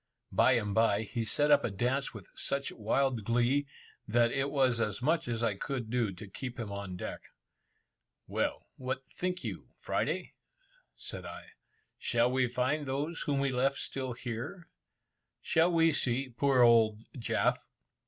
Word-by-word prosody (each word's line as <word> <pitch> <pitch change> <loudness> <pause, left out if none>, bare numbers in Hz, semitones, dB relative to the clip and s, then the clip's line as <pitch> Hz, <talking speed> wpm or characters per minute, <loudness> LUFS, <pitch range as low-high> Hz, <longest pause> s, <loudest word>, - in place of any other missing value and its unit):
Bye 130 - +5
and 105 -4 0
bye, 110 -1 +3
he 115 +2 -3
set 145 +6 +2
up 145 -1 +6
a - - 0
dance 125 +7 0
with 105 -6 -10
such 140 0 0
wild 120 +2 0
glee, 120 +6 +2 0.4
that 115 +2 +3
it 135 +1 0
was 130 -4 +2
as 105 -3 -1
much 160 +4 +1
as 120 -1 -2
I 115 - +2
could 120 +2 -4
do 120 -4 +1
to 95 +3 -10
keep 125 +5 -7
him 110 -3 -4
on 100 -2 -5
deck. - - -5 1.0
"Well, - - -2
what 130 0 -4
think 180 0 -2
you, - - -5
Friday?" - - -2 0.6
said - - -6
I; - - -9 0.5
"shall 120 +1 +2
we 130 -1 +2
find 130 +5 0
those 145 +5 -2
whom 140 -2 0
we 140 -1 +1
left 135 +2 +1
still 130 -2 -4
here? 120 - -6 0.7
Shall 165 +2 +3
we 165 -1 +4
see 130 -2 +1
poor 130 +1 +3
old 115 -2 +5
Jaf?" 120 - 0
125 Hz, 160 wpm, -31 LUFS, 115-140 Hz, 1.0 s, up